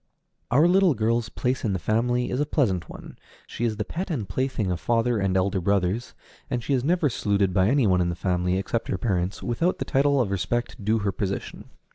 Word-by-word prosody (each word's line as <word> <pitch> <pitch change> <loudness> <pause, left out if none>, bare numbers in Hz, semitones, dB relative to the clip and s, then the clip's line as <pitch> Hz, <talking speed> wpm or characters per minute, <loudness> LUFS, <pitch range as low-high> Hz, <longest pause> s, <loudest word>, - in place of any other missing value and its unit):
Our 145 +7 +5
little 185 -3 +4
girl's 115 +1 0
place 125 +2 -2
in 105 - 0
the - - 0
family 120 +6 0
is 125 - -1
a 145 - +2
pleasant 100 - 0
one: - - -11 0.3
she 120 - -4
is 110 -2 -1
the 105 - -2
pet 180 - -4
and 125 - -3
plaything 110 -1 -1
of 90 - -2
father 120 -1 +1
and 95 -1 +1
elder 95 0 0
brothers, 100 +4 0 0.3
and 120 -1 -2
she 140 - -1
is 125 -2 +1
never 170 +1 +2
saluted 100 -6 0
by 95 0 +3
any 135 +1 +3
one 90 -3 +3
in 85 - +1
the 85 - -3
family, 90 0 0
except 115 +4 -2
her 95 - -1
parents, 95 -2 -2
without 165 +10 0
the - - -3
title 140 +1 +2
of 110 -6 0
respect 105 +5 -2
due 110 +3 +2
to 105 - -3
her 100 - +2
position. 95 +1 -5
110 Hz, 225 wpm, -25 LUFS, 95-125 Hz, 0.3 s, Our